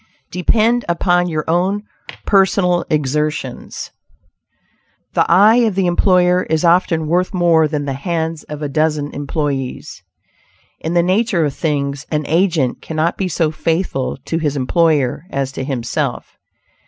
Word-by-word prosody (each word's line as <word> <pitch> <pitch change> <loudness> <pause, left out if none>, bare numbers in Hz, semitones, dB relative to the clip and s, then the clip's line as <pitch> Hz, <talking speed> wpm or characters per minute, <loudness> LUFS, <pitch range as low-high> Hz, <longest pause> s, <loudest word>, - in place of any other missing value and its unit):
DEPEND 225 +6 +2
UPON 175 +1 +1
YOUR 155 -2 -2
OWN 185 +5 0 0.4
PERSONAL 190 -3 +2
EXERTIONS. 150 -2 -2 1.2
The - - +1
eye 205 +6 +6
of 225 -5 +2
the 190 -1 +1
employer 180 0 +3
is 160 +2 +1
often 170 -2 +2
worth 180 +5 0
more 170 -3 +3
than 150 -1 -3
the 135 - -2
hands 160 +2 -3
of 150 0 -7
a - - -1
dozen 150 0 0
employees. 140 -3 -4 0.8
In 165 +2 -3
the 170 - +4
nature 185 -2 +1
of 145 - -2
things, 140 -2 -2
an 150 -1 -1
agent 165 -5 +1
cannot 160 +2 -1
be 190 - -2
so 165 -3 0
faithful 160 -3 -2
to 165 - -2
his 145 -3 -1
employer 150 0 +1
as 135 -1 -2
to 135 - -5
himself. 125 -3 -3
160 Hz, 140 wpm, -17 LUFS, 150-180 Hz, 1.2 s, eye